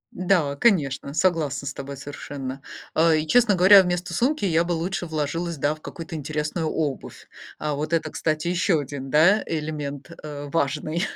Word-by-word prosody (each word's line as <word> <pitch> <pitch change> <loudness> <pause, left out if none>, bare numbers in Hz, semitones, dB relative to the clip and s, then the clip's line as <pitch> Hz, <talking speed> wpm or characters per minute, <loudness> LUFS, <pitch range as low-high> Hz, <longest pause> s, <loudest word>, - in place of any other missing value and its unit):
Да, 175 -6 +1
конечно, 140 - +1
согласна 155 -4 0
с 140 - -4
тобой 140 0 -7
совершенно. 135 -1 -7 0.3
Э, 160 0 +4
и, 155 - -2
честно 220 +2 +4
говоря, 190 +2 +8
вместо 175 -1 -2
сумки 265 - +1
я 165 -3 +3
бы 170 - -5
лучше 175 +2 -2
вложилась, 160 +2 -2
да, 145 +2 0
в 155 - -17
какую-то 165 +2 -8
интересную 155 +2 -2
обувь. 150 -4 -4 0.3
А 150 -1 -2
вот 155 +3 -4
это, 165 - 0
кстати, 155 0 -1
ещё 175 -1 +2
1, 135 -1 -6
да, 170 +8 +5
элемент, 150 -2 -4
э, 145 -1 -7
важный. 155 +2 -1
155 Hz, 165 wpm, -24 LUFS, 145-175 Hz, 0.3 s, говоря